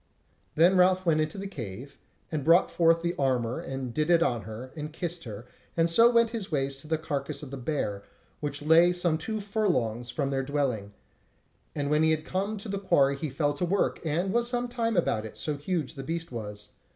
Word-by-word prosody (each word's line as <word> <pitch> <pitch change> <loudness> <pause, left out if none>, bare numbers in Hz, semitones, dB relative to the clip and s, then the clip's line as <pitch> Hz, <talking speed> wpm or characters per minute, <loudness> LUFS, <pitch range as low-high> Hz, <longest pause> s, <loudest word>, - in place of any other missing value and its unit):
Then 170 +4 +6
went 190 - +2
Ralph 185 +1 +4
into 155 0 +1
the 195 - -5
cave, 125 - -7 0.3
and 155 -3 -2
brought 165 +4 +5
forth 165 0 +3
the 170 0 0
armour 125 -3 0
and 135 -2 -5
did 155 +4 0
it 170 -1 +5
on 120 -8 0
her, 120 +4 -8
and 150 0 -5
kissed 170 0 -5
her, 110 0 -8 0.3
and 165 0 +4
so 230 +7 +7
went 235 -1 +3
his 220 -6 -5
ways 135 -2 0
to 140 - -14
the 160 0 +1
carcase 145 -1 -4
of 135 - -8
the 140 - -5
bear, 120 -7 -2 0.4
which 145 0 -4
lay 165 +3 +6
some 175 -3 +1
two 215 +6 -3
furlongs 170 - -1
from 140 +2 -2
their 135 -1 0
dwelling; 130 -8 -2 0.8
and 145 -1 -1
when 150 +1 +3
he 160 0 +4
came 190 +7 -3
to 205 - -8
the 200 -1 -2
quarry 140 -8 +3
he 150 +2 -4
fell 145 +2 0
to 145 - -4
work, 190 +3 0
and 175 +5 0
was 235 0 +2
some 245 0 -1
time 230 -3 -1
about 110 -10 +1
it, 110 -1 -9
so 145 +8 -2
huge 150 0 -2
as - - -18
the 135 - -5
beast 165 +2 -4
was. 105 -3 -6
155 Hz, 215 wpm, -28 LUFS, 135-180 Hz, 0.8 s, so